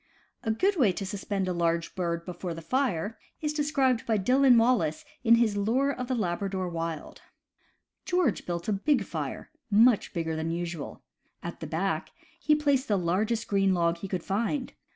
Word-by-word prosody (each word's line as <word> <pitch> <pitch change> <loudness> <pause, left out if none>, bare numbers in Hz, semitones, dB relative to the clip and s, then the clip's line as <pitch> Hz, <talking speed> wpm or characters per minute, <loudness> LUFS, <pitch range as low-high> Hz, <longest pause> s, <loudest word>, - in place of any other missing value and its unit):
A 225 - -3
good 375 - +2
way 240 - +4
to 195 - -4
suspend 195 -1 -3
a 180 - 0
large 170 -1 0
bird 170 -2 -2
before 175 -1 -5
the 165 - -8
fire 225 - -1 0.2
is 300 -1 -2
described 275 -5 +1
by 220 -2 +2
Dillon 250 +5 +5
Wallace 225 -10 +2 0.2
in 230 -1 +7
his 230 -3 +2
Lure 240 +8 +1
of 250 -2 -4
the 255 - 0
Labra 195 -2 -1
dor 185 -1 -2
Wild: 165 -2 -5 0.8
George 355 - 0
built 170 -1 -3
a 215 - +2
big 265 +8 +2
fire - - -5
— 260 - -53 0.2
much 225 - -1
bigger 160 -2 -2
than 160 +1 -2
usual. 170 -2 -5 0.4
At - - -6
the - - -5
back - - -1 0.3
he 305 -3 +3
placed 285 -3 +1
the 205 - +2
largest 210 +6 0
green 195 -2 +2
log 170 -1 +1
he 195 - -5
could 185 -3 -3
find. 230 +7 -1
205 Hz, 185 wpm, -28 LUFS, 175-255 Hz, 0.8 s, in